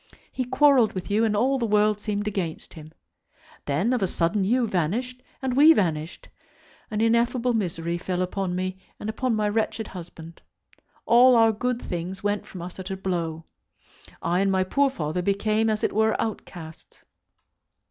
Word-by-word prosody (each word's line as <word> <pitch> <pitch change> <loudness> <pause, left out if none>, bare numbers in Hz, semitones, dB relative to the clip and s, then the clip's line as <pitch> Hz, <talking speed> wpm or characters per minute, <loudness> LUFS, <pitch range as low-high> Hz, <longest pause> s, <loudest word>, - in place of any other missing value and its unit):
He 255 - -3
quarrelled 270 -3 +4
with 185 +2 -5
you, 215 +2 +2
and 215 -2 +1
all 265 +4 +2
the 235 - 0
world 210 0 +2
seemed 205 -1 -2
against 185 -6 -4
him. 155 -1 -11 0.8
Then 160 - +1
of 245 - 0
a 190 - +2
sudden 175 +4 0
you 240 +5 +2
vanished, 225 +7 -2 0.2
and 255 -2 -1
we 305 +4 +8
vanished. 165 - -2 0.6
An 215 -2 -2
ineffable 235 +2 +2
misery 170 -5 -2
fell 185 0 -2
upon 185 0 -3
me 185 +1 -3 0.2
and 215 - -3
upon 245 +1 -1
my 210 -1 0
wretched 220 +1 -1
husband. 165 -2 -10 0.6
All 250 +2 +6
our 225 -1 +5
good 245 +3 -2
things 180 +1 -5
went 205 0 -1
from 180 -3 -8
us 180 +2 -9
at 190 +1 -6
a 190 - -4
blow. 165 -4 -3 0.8
I 175 +2 +1
and 195 0 +2
my 190 -1 +2
poor 275 +9 +2
father 160 - -3
became 215 +4 +1
as 215 -1 -1
it - - 0
were 220 +1 +2
outcasts. 175 -7 -7
205 Hz, 170 wpm, -25 LUFS, 180-230 Hz, 0.8 s, we